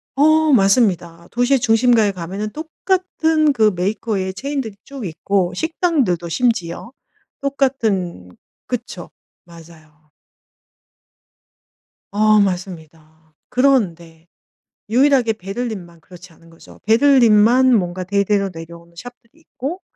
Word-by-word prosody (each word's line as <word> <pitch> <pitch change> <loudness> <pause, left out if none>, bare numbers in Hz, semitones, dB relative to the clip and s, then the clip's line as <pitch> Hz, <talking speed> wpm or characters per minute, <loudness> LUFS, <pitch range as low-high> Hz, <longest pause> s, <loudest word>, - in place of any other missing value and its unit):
어. 310 +2 +3
맞습니다. 190 -6 +1
도시의 245 +2 +2
중심가에 225 -2 +3
가면은 190 +4 -5
똑같은 320 - 0
그 220 -4 +3
메이커의 190 0 -2
체인들이 270 -3 -5
쭉 275 -5 -8
있고 180 +2 -1
식당들도 280 - -1
심지어 230 -2 -2 0.5
똑같은 225 - -1 0.4
그쵸. - - -6 0.4
맞아요. 155 -3 -18 2.0
어. 215 +1 +3
맞습니다. 160 -5 -5 0.2
그런데 175 -11 0 0.6
유일하게 250 -1 +3
베를린만 195 -4 -7
그렇지 180 0 -15
않은 165 +1 -21
거죠. 165 - -17
베를린만 240 0 +4
뭔가 180 -1 -3
대대로 200 +1 0
내려오는 170 +1 -12
shop들이 245 - -13
있고 300 +4 -7
210 Hz, 270 characters per minute, -19 LUFS, 175-255 Hz, 2.0 s, 베를린만